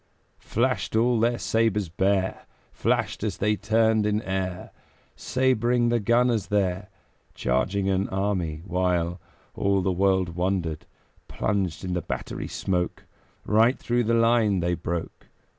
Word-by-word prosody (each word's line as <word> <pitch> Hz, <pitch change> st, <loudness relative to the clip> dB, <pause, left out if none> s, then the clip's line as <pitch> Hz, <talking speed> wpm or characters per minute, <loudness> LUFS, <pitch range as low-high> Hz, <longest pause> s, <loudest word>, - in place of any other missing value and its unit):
Flashed 115 Hz, -5 st, -1 dB
all 120 Hz, +1 st, +3 dB
their 120 Hz, +1 st, +2 dB
sabres 110 Hz, -4 st, +1 dB
bare, 95 Hz, +2 st, 0 dB, 0.2 s
Flashed -, -, -1 dB
as -, -, -2 dB
they 105 Hz, +1 st, +1 dB
turned 110 Hz, 0 st, +2 dB
in 105 Hz, 0 st, +1 dB
air, 95 Hz, -1 st, -3 dB, 0.4 s
Sabring 125 Hz, -2 st, +1 dB
the 120 Hz, 0 st, +2 dB
gunners 115 Hz, -1 st, +2 dB
there, 100 Hz, -1 st, 0 dB, 0.5 s
Charging 95 Hz, +11 st, 0 dB
an 95 Hz, 0 st, 0 dB
army, 95 Hz, -5 st, -2 dB
while 90 Hz, -2 st, 0 dB, 0.3 s
All 100 Hz, -1 st, +1 dB
the 95 Hz, -, +1 dB
world 95 Hz, 0 st, +2 dB
wondered; 85 Hz, -2 st, -2 dB, 0.4 s
Plunged 95 Hz, -5 st, -2 dB
in 90 Hz, -, -2 dB
the 90 Hz, -, -1 dB
battery -, -, -5 dB
smoke, 90 Hz, -2 st, -2 dB, 0.4 s
Right 115 Hz, +4 st, +3 dB
through 120 Hz, 0 st, 0 dB
the 115 Hz, +1 st, +2 dB
line 115 Hz, -4 st, +3 dB
they 90 Hz, 0 st, 0 dB
broke. 85 Hz, 0 st, -5 dB
100 Hz, 130 wpm, -25 LUFS, 90-115 Hz, 0.5 s, all